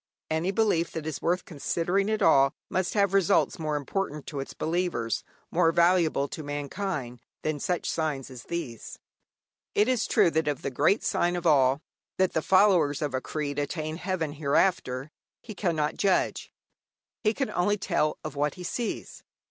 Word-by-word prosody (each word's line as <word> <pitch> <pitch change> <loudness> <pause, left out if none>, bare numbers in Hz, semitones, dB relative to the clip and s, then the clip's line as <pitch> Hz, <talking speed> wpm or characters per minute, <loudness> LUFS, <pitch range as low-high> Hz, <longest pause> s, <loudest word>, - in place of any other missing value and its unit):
Any 160 +3 0
belief 195 -5 +2
that 160 -2 -4
is 160 -2 -4
worth 175 +2 0
considering 175 +6 -1
at 215 0 0
all 140 -2 +5 0.2
must 185 +2 -1
have 200 -2 +3
results 195 -2 +3
more 155 -2 -1
important 150 0 -3
to 145 - -5
its 135 - -6
believers, 160 -9 -1 0.3
more 165 -1 +3
valuable 170 -4 +3
to 155 - -6
mankind, 145 -3 -4 0.2
than 155 -1 -1
such 175 +4 -1
signs 145 -5 -2
as 125 -2 -10
these. 150 -10 -5 0.8
It 210 - +4
is 255 -3 +1
true 170 - +4
that 160 -1 0
of 145 -3 -2
the - - -2
great 195 - +2
sign 175 +1 +1
of 175 -1 -4
all, 140 -2 +4 0.3
that 185 -1 +2
the 160 - +1
followers 180 -7 +4
of 145 -3 -2
a 130 - -1
creed 145 -2 -3
attain 155 +2 -3
heaven 180 -4 -2
hereafter, 145 -2 0 0.3
he 220 - -9
cannot 165 -6 -1
judge. 195 -2 +1 0.7
He 215 0 +2
can 270 - -1
only 205 +4 +1
tell 155 -5 0
of - - -6
what 145 0 0
he 180 - -8
sees. 230 +5 -4
160 Hz, 170 wpm, -27 LUFS, 145-185 Hz, 0.8 s, all